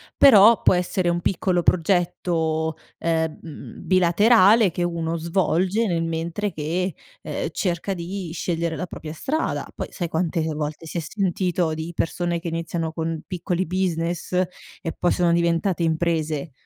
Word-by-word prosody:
però 225 -4 +7
può - - +5
essere 180 0 0
un 170 - +1
piccolo 180 0 0
progetto, 165 -3 +1 0.2
ehm, 160 -1 -3
bilaterale 195 +3 +5
che 175 - -2
uno 170 -1 -2
svolge 185 +5 +1
nel 170 -2 0
mentre 165 +5 -2
che, 170 +4 -2 0.3
ehm, - - -3
cerca 180 +1 -1
di 180 0 -5
scegliere 170 -1 -2
la 180 - -3
propria 155 -3 -8
strada. 300 - -2
Poi - - -4
sai 175 - -3
quante 165 0 -1
volte, 150 +2 -4
si 160 +2 -5
è - - 0
sentito 180 -2 -1
di 160 +2 -5
persone 170 +1 -1
che 170 - -7
iniziano 165 0 -3
con 160 -1 -3
piccoli 180 0 -2
business 175 -1 -2
e 180 -1 -3
poi 175 - +2
sono 175 -1 +2
diventate 170 +1 +1
imprese. 160 -2 0
170 Hz, 145 wpm, -23 LUFS, 165-185 Hz, 0.3 s, però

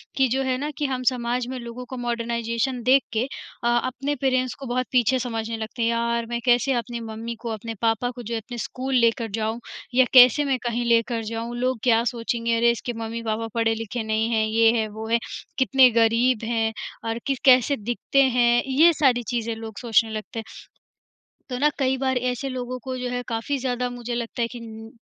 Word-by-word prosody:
कि 265 -1 +3
जो 265 +3 0
है 260 -1 0
ना 290 +3 -3
कि 295 - -1
हम 260 -2 -2
समाज 245 0 -2
में 260 +1 -5
लोगों 235 +1 -8
को 260 - -6
मॉडर्नाइजेशन 235 +1 -2
देख 260 +2 +5
के 220 +1 +1 0.4
अ, - - +1
अपने 255 +4 0
पेरेंट्स 255 -2 +1
को 270 - -7
बहुत 255 +1 -1
पीछे 255 0 +3
समझने 225 -2 -3
लगते 220 +2 -6
हैं। 230 - +2
यार, 235 0 0
मैं 235 0 -2
कैसे 245 +2 +3
अपनी 240 -1 -3
मम्मी 225 +1 -6
को, 235 - -4
अपने 225 +1 -5
पापा 230 +2 +1
को 245 0 -8
जो 235 +1 -5
है 225 - -1
अपने 240 0 -7
स्कूल 260 +3 -3
लेकर 230 -1 +2
जाऊँ 220 +1 -2 0.4
या 260 0 +6
कैसे 255 +3 +8
मैं 270 -2 +1
कहीं 240 0 -1
लेकर 230 0 +2
जाऊँ? 230 +2 -4
लोग 255 0 0
क्या 230 -2 +4
सोचेंगे 230 0 -1
अरे 235 +1 +4
इसके 240 +1 -4
मम्मी-पापा 225 0 -3
पढ़े-लिखे 225 0 -1
नहीं 220 +1 0
हैं, 220 -1 +2
ये 225 +1 +4
है, 220 - 0
वो 220 +1 -7
है, 235 - +3 0.4
कितने 260 -1 +5
गरीब 230 +1 +2
हैं 225 -1 0 0.4
और 225 - -2
किस 275 -2 0
कैसे 255 +1 +6
दिखते 240 +5 +1
हैं? 240 -2 +3
ये 315 +6 +5
सारी 260 -5 +2
चीज़ें 230 -1 -1
लोग 220 -2 -8
सोचने 225 -1 +2
लगते 215 +1 -5
हैं। - - -5 1.1
तो 250 - -3
ना 300 - +4
कई 265 -1 +1
बार 260 -1 0
ऐसे 250 +2 -2
लोगों 255 0 -4
को 260 -1 -4
जो 250 0 -3
है 245 0 -2
काफ़ी 230 +5 -2
ज़्यादा 250 -1 -1
मुझे 245 0 -6
लगता 235 0 -4
है 230 - +2
कि 245 - -7
न 225 -1 -10
240 Hz, 210 wpm, -24 LUFS, 230-255 Hz, 1.1 s, कैसे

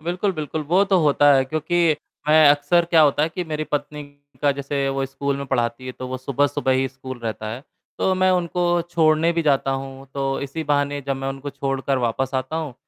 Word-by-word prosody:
बिल्कुल, 180 +5 -1
बिल्कुल, 155 -1 -4
वो 180 +7 +3
तो 195 -2 +2
होता 145 -1 +5
है 135 - +3
क्योंकि 155 +3 +1 0.3
मैं 155 -1 +7
अक्सर 145 +4 +3
क्या 165 - +6
होता 145 0 +3
है 155 - +2
कि 180 +2 -5
मेरी 155 -1 -3
पत्नी 150 0 -4 0.4
का 145 - +4
जैसे 140 0 -2
वो 135 0 -1
स्कूल 140 +1 -3
में 140 0 -5
पढ़ाती 120 -1 -1
है, 130 - -5
तो 130 - -7
वो 130 - -3
सुबह-सुबह 140 +1 0
ही 130 +1 +1
स्कूल 130 -1 -9
रहता 110 -1 -4
है, 125 +4 -7 0.4
तो 190 - +2
मैं 185 0 +3
उनको 175 -1 +1
छोड़ने 160 0 +3
भी 170 0 0
जाता 135 -2 +2
हूँ, 135 0 -5
तो 135 -1 -1
इसी 140 +3 -5
बहाने 145 -1 0
जब 135 - -1
मैं 135 0 -4
उनको 135 +1 -5
छोड़कर 135 -1 -2
वापस 125 +2 -1
आता 130 +5 -2
हूँ, 155 -6 -4
145 Hz, 215 wpm, -22 LUFS, 135-160 Hz, 0.4 s, मैं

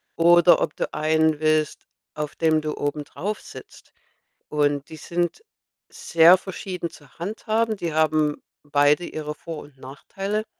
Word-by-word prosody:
oder 175 +1 +6
ob - - -1
du - - -2
einen 155 0 +2
willst, 155 -1 0 0.3
auf 150 -1 -4
dem 160 -1 +2
du 155 0 -4
obendrauf 150 +8 -4
sitzt - - -13 0.6
und 145 -1 0
die 160 - -9
sind 175 - -3 0.5
sehr 170 +2 +5
verschieden 185 -2 -6
zu 145 -4 -18
handhaben. 220 +4 -1
Die 170 -4 -3
haben 155 -1 +1 0.2
beide 145 +3 +3
ihre 150 -2 -5
Vor 165 -1 -7
und 145 -2 -18
Nachteile. 195 +11 -5
155 Hz, 135 wpm, -23 LUFS, 150-175 Hz, 0.6 s, oder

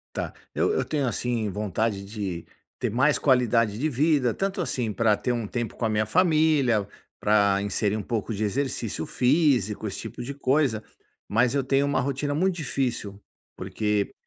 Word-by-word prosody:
Tá, - - -3 0.2
eu - - +1
eu 430 - 0
tenho, 145 -4 -1
assim, 115 -1 -1
vontade 105 0 -2
de 100 -5 -5 0.3
ter - - -2
mais 130 +6 +3
qualidade 120 -5 +2
de 155 +4 +1
vida, 140 -2 +2
tanto 195 - -2
assim, 120 -9 -2
pra 105 0 +2
ter 125 - -1
um 120 -3 -2
tempo 120 +1 -4
com 120 - -2
a 110 - +1
minha 110 0 +1
família, 155 - +3 0.3
pra 100 -2 +3
inserir 105 +1 0
um 105 - -4
pouco 115 +1 -3
de 110 0 -2
exercício 115 - -2
físico, 125 - +2
esse 100 - -5
tipo - - -7
de 135 +3 -5
coisa, 135 -5 +1 0.4
mas 120 +4 +2
eu 140 - +1
tenho 135 +1 +2
uma 140 - +1
rotina 140 +2 -1
muito 185 +5 +2
difícil, 125 - -3 0.4
porque 100 +2 -1
120 Hz, 175 wpm, -25 LUFS, 105-140 Hz, 0.4 s, mais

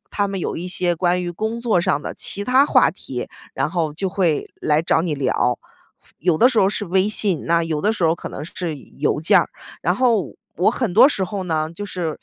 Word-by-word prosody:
他 205 -1 0
们 195 -2 -4
有 - - -3
一 175 +2 -5
些 180 -1 +1
关 180 +1 +1
于 175 - -3
工 220 +6 -3
作 220 -7 +2
上 145 -3 0
的 - - -5
其 200 - -1
它 260 +4 +4
话 - - +4
题， - - -7 0.3
然 - - -1
后 165 -4 -1
就 190 +3 -2
会 180 -5 0
来 150 +1 +2
找 165 - +2
你 165 -4 -1
聊。 125 -2 0 0.6
有 170 -1 +1
的 250 - +6
时 235 -4 0
候 190 - +4
是 205 0 -2
微 190 +3 +2
信， 200 -6 0
那 170 0 +2
有 160 -2 -2
的 215 +2 +2
时 195 - -5
候 160 - +3
可 - - -8
能 145 - -7
是 165 -2 -5
邮 145 +2 -3
件 195 +4 +5
儿， - - -3 0.3
然 180 +2 +1
后 235 -5 +1 0.2
我 185 +5 +3
很 235 -6 -2
多 230 +8 +7
时 195 -9 -1
候 195 0 -5
呢， 160 -2 -1
就 205 +3 -6
是 175 -5 -4
180 Hz, 250 characters per minute, -21 LUFS, 160-205 Hz, 0.6 s, 多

